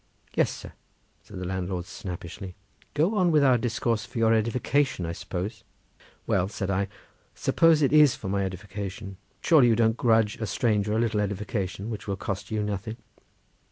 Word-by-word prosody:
"Yes, - - +3
sir," - - -9 0.5
said 105 - -11
the 90 - -4
landlord 90 -1 -3
snappishly, 90 -2 -7 0.4
"go 160 +8 +2
on 185 -4 +3
with 150 -2 +4
our 130 -3 +5
discourse; 115 -1 0
for 120 - -9
your 115 0 +4
edification, 115 0 +1
I 85 - -3
suppose?" 90 +6 -5 0.6
"Well," 95 -1 +1
said 100 -1 -3
I, 95 +1 0 0.5
"suppose 165 -2 +4
it 140 - +2
is 150 -4 +6
for 95 - -7
my 100 +1 0
edification, 95 +1 -6 0.3
surely 150 -7 +6
you 115 - +4
don't 110 0 +2
grudge 115 -1 +3
a 110 -2 -3
stranger 105 +1 +1
a 110 - +2
little 115 -2 +1
edification 100 +1 -3
which 110 - -6
will 100 - -1
cost 100 +2 -4
you 110 -1 -1
nothing?" 105 +2 -4
105 Hz, 170 wpm, -26 LUFS, 95-120 Hz, 0.6 s, is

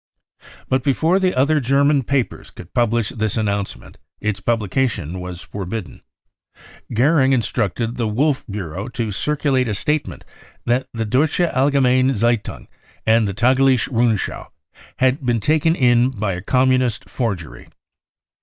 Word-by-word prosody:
But 130 0 +1
before 160 +7 +2
the 185 -1 +1
other 145 +4 +3
German 140 +2 +2
papers 135 0 -2
could 90 - -13
publish 120 -2 +1
this 110 -2 -2
announcement, 100 -2 -3 0.2
its 110 -2 -2
publication 105 - -1
was 90 0 -7
forbidden. 100 -2 -6 0.9
Goering 135 +3 +3
instructed 115 0 -1
the 115 -2 0
Wolf 135 +6 0
Bureau 100 0 -5
to 115 -3 -3
circulate 140 +2 0
a 105 - -1
sta 150 +9 +1
tement - - -11 0.4
that 125 +2 0
the 115 -1 -3
Deutsche 140 +10 +1
Allgemeim 135 -4 +2
Zeitung 115 +1 -1 0.4
and 110 -1 +3
the 100 - -3
Tagliche 130 +2 +3
Rundschau 115 -4 0 0.5
had 130 +2 +1
been 120 -2 +1
taken 155 +7 +2
in 125 -2 +3
by 105 -6 -2
a 90 - -5
Communist 130 +1 +1
forgery. 85 - -4
120 Hz, 135 wpm, -20 LUFS, 105-135 Hz, 0.9 s, other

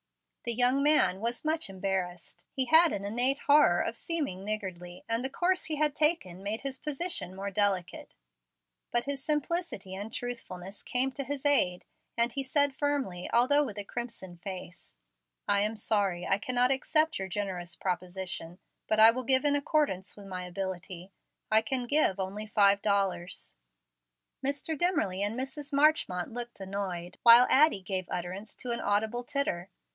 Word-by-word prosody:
The 235 - +1
young 250 +3 +3
man 290 -10 +4
was 235 +6 -3
much 315 -6 0
embarrassed. 185 -3 -4
He 265 - 0
had 320 +5 +6
an 200 0 -3
innate 245 +6 +1
horror 285 -12 +5
of 230 - -2
seeming 280 - -3
niggardly, 185 -4 -5
and 230 +1 0
the 265 - -2
course 365 +6 0
he 310 0 -2
had 300 -1 0
taken 300 - +1
made 205 +3 -3
his 270 -1 -5
position 300 - -1
more 200 +1 -5
delicate. 195 -3 -1 0.7
But 240 0 +1
his 280 -1 -4
simplicity 300 - -2
and 205 +3 -6
truthfulness 205 -6 -6
came 260 +2 +1
to 275 +1 -5
his 280 +1 -5
aid, 185 -11 +3 0.3
and 235 +1 +3
he 275 - -2
said 285 +1 +2
firmly, 270 -11 -2
although 270 +5 +4
with 215 -7 -6
a 205 - -3
crimson 200 -5 -6
face, 180 - -9 0.5
"I 200 - +3
am 215 +2 -1
sorry 200 -5 0
I 195 - +1
cannot 250 +3 +1
accept 310 +3 +1
your 190 - -3
generous 180 -3 -4
proposition, 180 -1 -4 0.3
but 215 - +1
I 220 +1 +9
will 255 +2 -4
give 260 +2 +3
in 290 0 +3
accordance 285 - -1
with 200 - -11
my 185 -2 -6
ability. 185 0 -6 0.4
I 220 0 +6
can 245 +2 -1
give 240 -8 +2
only 200 +3 -4
five 200 -1 +4
dollars." 190 - -1 0.9
Mr. 280 +4 -1
Dimmerly 295 - 0
and 210 +4 -1
Mrs. 275 +3 -5
Marchmont 280 - +2
looked 240 -1 -7
annoyed, 190 -3 -5
while 235 +1 +9
Addie 280 -9 +5
gave 185 -1 -3
utterance 185 +4 -5
to 250 - -5
an 235 - -2
audible 220 +4 0
titter. 240 -10 -2
220 Hz, 165 wpm, -29 LUFS, 190-275 Hz, 0.9 s, I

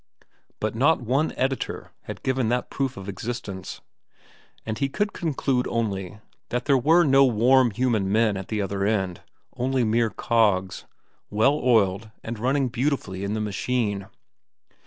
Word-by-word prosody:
But 110 -1 -1
not 145 +8 +3
one 130 +6 0
editor 130 +1 -2
had - - -8
given 130 -3 0
that 125 +1 -1
proof 135 -2 -2
of 100 0 -8
existence. 100 -2 -6 0.8
And 110 -1 -4
he 140 - 0
could 205 +8 -1
conclude 135 -5 -1
only 105 -4 -3 0.3
that 125 +1 -2
there 140 - +4
were 160 +7 +5
no 135 -2 +5
warm 125 +1 +4
human 110 -3 0
men 110 -1 +3
at 95 -1 -5
the 105 -2 -1
other 100 0 -2
end, 95 -4 0 0.3
only 130 0 0
mere 115 +1 +2
cogs, 105 -6 +1 0.4
well 110 +7 +3
oiled 110 -3 +2
and 115 -1 -5
running 130 +2 +1
beautifully 120 -7 -2
in 100 +2 -2
the 110 - -2
machine. 105 -1 -1
115 Hz, 150 wpm, -25 LUFS, 100-130 Hz, 0.8 s, were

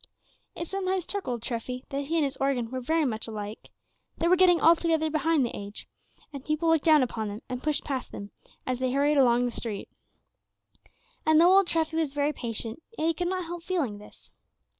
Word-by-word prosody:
It 335 - -5
sometimes 375 -1 -1
struck 400 0 -4
old 240 -3 -3
Treffy 250 +2 -4
that 280 0 -3
he 325 +4 -2
and 325 - +3
his 275 -1 -2
organ 255 -4 0
were 260 - -3
very 315 +5 +1
much 225 -3 -2
alike, 215 -1 -7 0.5
they 335 - +1
were 360 - +6
getting 360 -2 +5
altogether 325 -1 +3
behind 310 -2 +2
the 235 - -5
age; 200 +1 -8 0.5
and 275 -2 -7
people 305 +2 0
looked 325 -2 +3
down 310 -4 +6
upon 225 -3 -3
them 205 +2 -7
and 250 -1 -5
pushed 300 0 -1
past 265 -3 -4
them, 200 0 -8 0.3
as 255 -1 -2
they 255 -1 0
hurried 285 +1 +3
along 245 -2 +4
the 245 - -1
street. 220 -4 -5 1.3
And 315 0 +5
though 355 +3 +7
old 390 -2 +5
Treffy 320 -1 0
was 305 -4 -1
very 290 +1 +1
patient, 230 +1 -5 0.2
yet 315 - 0
he - - +2
could 350 +2 -2
not 365 -1 -2
help 345 +1 -6
feeling 320 - -2
this. 210 - -16
285 Hz, 205 wpm, -27 LUFS, 245-330 Hz, 1.3 s, though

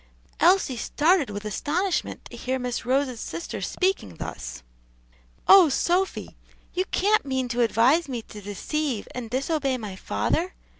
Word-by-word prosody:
Elsie 350 -7 +4
started 310 - +2
with 205 +1 -6
astonishment 345 - -1
to - - -10
hear 260 +1 -2
Miss 250 -1 -4
Rose's 260 -2 +1
sister 340 - -5
speaking 370 - -1
thus. 65 -5 -7 0.8
"Oh, 375 -5 +9
Sophy! 355 +7 0 0.4
you 370 +1 0
can't 415 +4 +2
mean 260 -2 -1
to 240 +1 0
advise 250 +8 +3
me 240 -3 -4
to 210 - -11
deceive 230 +5 -3
and 245 -3 -5
disobey 270 +1 0
my 210 -5 -6
father?" 340 - -1
265 Hz, 140 wpm, -25 LUFS, 230-340 Hz, 0.8 s, Oh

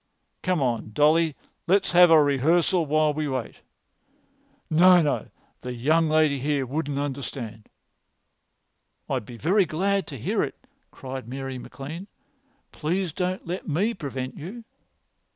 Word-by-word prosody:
"Come 180 -6 0
on, 115 -4 -2
Dolly, 155 +3 +3 0.3
let's 195 +2 +3
have 175 0 +7
a 160 -2 +7
rehearsal 160 +5 +2
while 155 0 +2
we 155 0 -2
wait." 130 -4 -4 1.1
"No, 180 +3 +6
no; 150 -4 0 0.3
the 125 0 -5
young 155 +7 +2
lady 155 -3 +3
here 140 0 0
wouldn't 145 +1 -3
understand." 130 -6 -5 1.4
"I'd 125 -6 -2
be 120 - -9
very 185 - +3
glad 195 +3 0
to 140 - -7
hear 110 - -1
it," - - -3 0.3
cried 130 -2 -8
Mary 135 0 -5
MacLean. 155 +9 -8 0.6
"Please 175 +2 -2
don't 185 +1 -2
let 180 +2 -5
me 190 +9 +1
prevent 135 - -5
you." 200 +10 -8
150 Hz, 135 wpm, -25 LUFS, 135-175 Hz, 1.4 s, have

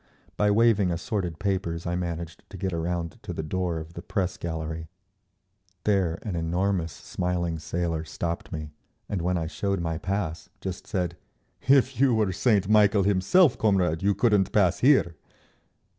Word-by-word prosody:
By 105 - +2
waving 105 -2 +4
assorted 90 -1 -2
papers 95 -4 -2
I 85 - -1
managed 85 -1 -4
to - - -9
get 95 -2 -2
around 85 0 -3
to - - -6
the 80 - -4
door 90 +1 -1
of 80 +1 -7
the 85 - -7
press 95 0 -2
gallery. 80 -1 -4 1.0
There 95 -5 +1
an 105 -6 -3
enormous 85 +1 0
smiling 85 -2 -2
sailor 85 0 -2
stopped 85 +1 -4
me, 75 -1 -5 0.4
and 100 -4 -2
when 90 +1 0
I 80 - -2
showed 100 +4 -2
my 80 -2 -2
pass, 95 -4 -3
just 95 -2 -6
said, 90 -3 -2 0.5
"If 135 -1 +4
you 130 -3 +4
were 105 -4 +2
Saint 100 0 +2
Michael 105 -1 +5
himself, 100 - +4
comrade, 90 -6 +2
you 100 +1 +2
couldn't 105 -5 +3
pass 95 -5 +3
here!" 125 - +4
90 Hz, 160 wpm, -26 LUFS, 85-100 Hz, 1.0 s, Michael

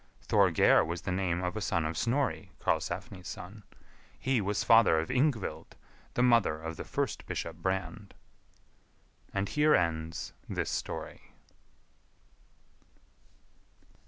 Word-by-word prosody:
Thorgeir - - +4
was 85 +2 -4
the 95 - -2
name 90 -1 0
of 90 +2 -2
a 110 - -3
son 85 -5 0
of 80 +1 -2
Snorri, 130 - 0
Karlsefni's 90 -3 -2
son; 100 +4 -8 0.6
he 130 -4 +1
was 100 +1 -1
father 115 -8 +6
of 80 - -3
Yngvild, 130 -4 0 0.4
the 120 - +3
mother 115 -11 +4
of 80 +1 -5
the - - -6
first - - -3
Bishop 85 0 -4
Brand. 95 +3 -3 1.2
And 100 0 -1
here 150 +4 +4
ends 80 0 -1 0.2
this - - -2
story. - - -5
95 Hz, 120 wpm, -30 LUFS, 85-115 Hz, 1.2 s, father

